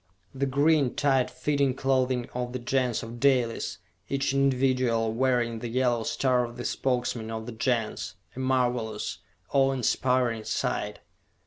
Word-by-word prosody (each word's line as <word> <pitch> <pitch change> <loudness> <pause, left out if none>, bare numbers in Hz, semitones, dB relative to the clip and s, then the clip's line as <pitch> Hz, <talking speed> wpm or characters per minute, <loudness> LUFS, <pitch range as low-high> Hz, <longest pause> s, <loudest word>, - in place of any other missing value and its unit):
The 135 +1 -1
green, 140 0 +3
tight 135 -3 +2
fitting 140 0 0
clothing 130 -2 +1
of 125 0 -3
the - - -1
Gens 125 -1 0
of 115 +1 -8
Dalis, 125 -4 +1 0.3
each 140 -1 0
individual 130 -4 +2
wearing 120 -2 +1
the 120 - -4
yellow 120 0 +1
star 125 +2 +1
of 120 0 -7
the 120 - -5
Spokesman 120 -3 -1
of 110 0 -4
the 120 - -6
Gens! 115 -2 -1 0.2
A - - -7
marvelous, 120 -7 0 0.3
awe 135 -1 +4
inspiring 125 -2 +1
sight! - - -2
125 Hz, 140 wpm, -27 LUFS, 120-130 Hz, 0.3 s, awe